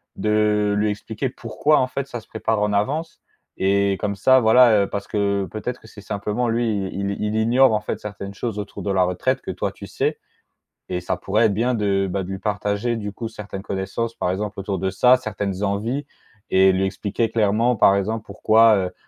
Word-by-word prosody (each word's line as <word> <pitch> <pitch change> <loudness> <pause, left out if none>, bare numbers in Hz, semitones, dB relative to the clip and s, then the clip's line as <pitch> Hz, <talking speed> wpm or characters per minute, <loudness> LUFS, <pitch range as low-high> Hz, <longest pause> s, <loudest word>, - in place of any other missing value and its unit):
de 105 -1 +1
lui 105 +1 +1
expliquer 110 +4 -3
pourquoi, 150 +3 +1
en 130 - +1
fait, 140 +1 -4
ça 120 -4 -6
se - - -24
prépare 110 -1 -1
en 105 0 +1
avance 145 +11 -1 0.4
et 100 0 +2
comme 100 -1 -2
ça, 130 +6 +5
voilà, 110 -2 +6
heu, - - -2
parce 100 - -4
que 100 -1 0
peut-être 125 +3 -5
que - - -15
c'est 110 - -13
simplement 105 +3 -2
lui, 115 -4 0
il 100 0 -2
il 100 - -5
il 105 0 -1
ignore, 120 +3 +4
en 105 - +1
fait, 105 - -4
certaines 100 -1 -7
choses 110 +1 -4
autour 105 0 -6
de 100 - -1
la 95 -1 +3
retraite 110 +9 0
que - - -5
toi - - -3
tu - - -10
sais - - -2 0.7
et 90 - -1
ça 90 - -2
pourrait 105 +5 +2
être 105 - 0
bien 120 +5 +1
de, 100 -4 +1
bah, 95 +2 -1
de 90 - -8
lui 95 0 -4
partager, 105 +3 -1
du 105 -2 -4
coup, 115 +3 -6
certaines 105 -3 -8
connaissances, 100 +4 -3
par - - -2
exemple 100 +2 -3
autour 95 0 -3
de 95 +2 -1
ça. 125 +6 +5
Certaines 105 -5 -4
envies 110 +8 -1 0.5
et 95 0 +5
lui 95 +1 0
expliquer 100 +4 -2
clairement, 115 +3 +2
par 100 -3 +5
exemple, 110 +3 -2
pourquoi, 110 +2 +4
heu, 95 -2 -2
105 Hz, 215 wpm, -22 LUFS, 100-115 Hz, 0.7 s, voilà